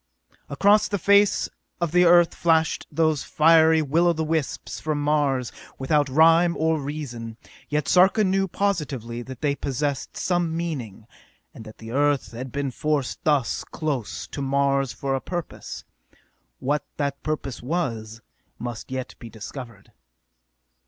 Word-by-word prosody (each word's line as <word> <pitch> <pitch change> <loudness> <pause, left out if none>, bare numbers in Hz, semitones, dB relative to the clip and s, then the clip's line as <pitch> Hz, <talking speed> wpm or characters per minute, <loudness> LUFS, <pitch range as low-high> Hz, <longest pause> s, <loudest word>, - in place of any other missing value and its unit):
Across 205 +1 +4
the 205 - -1
face 200 +2 +4 0.3
of 170 -3 -1
the 180 +1 +5
Earth 175 0 +6
flashed 160 -2 +1
those 155 -2 +1
fiery 160 0 +5
will 160 +5 +2
o' 170 - +4
the 160 0 -2
wisps 155 -2 -2
from 155 -1 -2
Mars, 145 -4 +1 0.3
without 145 +1 +1
rhyme 165 +4 +5
or 160 0 +1
reason; 130 -6 -6 0.3
yet 150 -3 -1
Sarka 190 - +5
knew 195 0 +1
positively 150 - -2
that 130 0 -9
they 145 -2 +1
possessed 140 0 -3
some 175 -3 0
meaning, 130 - -5 0.5
and 110 - -11
that 110 - -12
the 115 0 -9
Earth 145 +1 +1
had 125 +2 -7
been 140 -1 -2
forced 145 -1 -2
thus 145 -5 +1
close 140 -9 -4
to 140 - -6
Mars 140 -1 +1
for 135 -1 -3
a 135 - -1
purpose. 175 -2 -6 0.7
What 145 +3 -1
that 140 -1 -2
purpose 150 -4 -4
was 115 -7 -3 0.4
must 120 -1 -6
yet 130 -1 -5
be 115 - -9
discovered. 115 -1 -10
145 Hz, 145 wpm, -24 LUFS, 130-165 Hz, 0.7 s, Earth